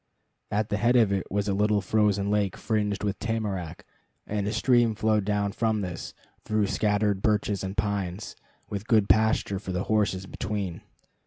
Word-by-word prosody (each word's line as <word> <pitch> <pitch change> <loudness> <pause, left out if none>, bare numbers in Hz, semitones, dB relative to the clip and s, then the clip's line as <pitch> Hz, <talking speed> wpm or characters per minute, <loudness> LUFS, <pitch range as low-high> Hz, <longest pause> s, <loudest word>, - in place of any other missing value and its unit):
At 105 +1 -1
the 105 - 0
head 120 +4 +2
of 115 -5 +5
it 95 -2 -2
was 100 +1 0
a 100 - +1
little 105 +1 +2
frozen 100 0 +1
lake 105 -3 0
fringed 105 -3 -1
with 100 -1 -2
tamarack, 100 -7 -3 0.4
and 105 -1 -2
a - - 0
stream 120 0 +3
flowed 110 -2 +1
down 100 -1 0
from 110 0 0
this 90 -3 -6 0.3
through 110 -1 +1
scattered 105 -1 +1
birches 105 -2 +1
and 95 +2 -5
pines, 100 -1 -2 0.3
with 105 +1 -5
good 110 -3 +4
pasture 105 0 +2
for 95 -1 -6
the 90 +1 -1
horses 100 -3 0
between. 100 -3 -4
105 Hz, 170 wpm, -27 LUFS, 100-110 Hz, 0.4 s, of